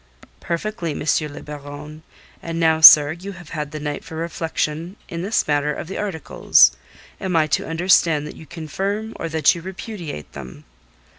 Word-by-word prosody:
"Perfectly, 170 -1 -3
M. - - -5 0.3
le - - -10
Baron. 150 +1 -9 0.4
And 165 0 -5
now, 160 -1 +2
sir, 150 -2 +10
you 185 +5 -8
have 175 -3 -13
had 150 -2 -4
the 155 +1 -7
night 145 -1 -5
for 160 - -10
reflection 165 +1 -3
in 170 0 -6
this 200 +5 0
matter 145 0 +1
of 150 - -6
the 190 - -6
articles. 160 - +3 0.5
Am 185 -2 -3
I 160 -1 +4
to 155 - -1
understand 165 -3 +2
that 150 - -9
you 160 - -13
confirm 195 +8 -4
or 165 - -4
that 160 -3 +3
you 170 - -8
repudiate 175 - -8
them?" 65 -2 -10
160 Hz, 170 wpm, -21 LUFS, 150-175 Hz, 0.5 s, sir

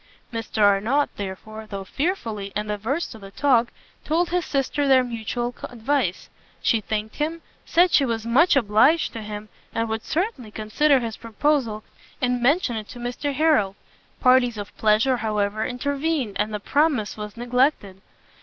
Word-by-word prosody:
Mr 225 -1 -1
Arnott, 215 +8 +3
therefore, 215 +3 -7
though 200 -2 -5
fearfully, 225 - -3
and 210 0 -2
averse 230 +11 -1
to 220 - -10
the 195 -1 -10
talk, 240 +1 +3 0.4
told 335 +3 0
his 360 -1 0
sister 280 +1 0
their 260 -1 +6
mutual 240 +1 -3
advice. 245 -5 -1 0.3
She 225 - +2
thanked 215 +1 -4
him, 320 +2 -2 0.2
said 350 +1 +4
she 290 - +5
was 230 -3 -2
much 285 +10 +4
obliged 260 +7 +3
to 225 - -5
him, 210 0 -7 0.3
and 230 0 0
would 220 0 -2
certainly 320 - -2
consider 250 +7 +2
his 225 -2 -4
proposal, 230 -1 0 0.4
and 250 -1 0
mention 255 -2 +2
it 215 -1 -6
to - - -10
Mr 245 +4 -3
Harrel. 290 -11 +3 0.4
Parties 255 -3 +4
of 205 -2 -7
pleasure, 220 +4 +3
however, 215 -1 -1
intervened, 280 -2 -2
and 210 +1 0
the 210 - -3
promise 280 -2 +1
was 210 0 -7
neglected. 240 -5 0
235 Hz, 155 wpm, -24 LUFS, 215-285 Hz, 0.4 s, their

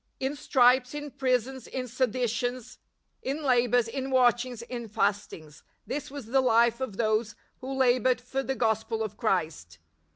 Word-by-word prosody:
" - - -48
In 290 - -6
stripes, 255 -1 +3
in 295 -1 -6
prisons, 260 -1 -1
in 255 -1 -4
seditions, 245 0 -2 0.4
in 285 +4 -3
labours, 245 -3 +3
in 265 +3 -4
watchings, 245 -2 +2
in 235 -1 -6
fastings 180 -8 -2 0.2
''—this 285 +1 -4
was 280 -3 -8
the 265 +4 +2
life 235 -1 +3
of 225 -7 -4
those 215 -1 0 0.2
who 260 +1 -6
laboured 255 -1 +2
for 265 +2 -3
the 270 0 -3
Gospel 220 -1 0
of 215 -1 -5
Christ. 160 - -2
245 Hz, 155 wpm, -28 LUFS, 225-260 Hz, 0.4 s, stripes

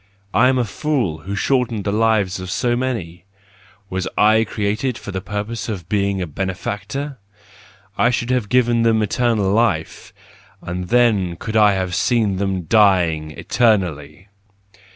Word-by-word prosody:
I 125 +3 +5
am 130 - +2
a 125 - +1
fool, 115 - -2
who 95 +6 -5
shortened 125 -3 0
the 100 - -1
lives 105 -3 +1
of 95 0 -7
so 120 +5 0
many! 105 -10 -4 0.6
Was 95 -1 -3
/ - - -36 0.3
created 110 +5 -2
for 100 - -8
the 95 0 -4
purpose 105 +4 -4
of 95 -7 -5
being 100 -1 0
a 90 - -2
benefactor? 100 - -4 0.8
I 120 - +4
should 120 0 -1
have 125 -5 0
given 120 -2 +3
them 115 -1 +3
eternal 105 -2 +1
life: 100 -8 0 0.5
and 90 +1 -5
then 110 -6 +2
I - - -9
could 110 +6 -6
have 100 -4 +3
seen 110 -5 +1
them 95 -2 -2
dying 90 -6 +3
eternally. 90 - 0
105 Hz, 150 wpm, -20 LUFS, 95-115 Hz, 0.8 s, I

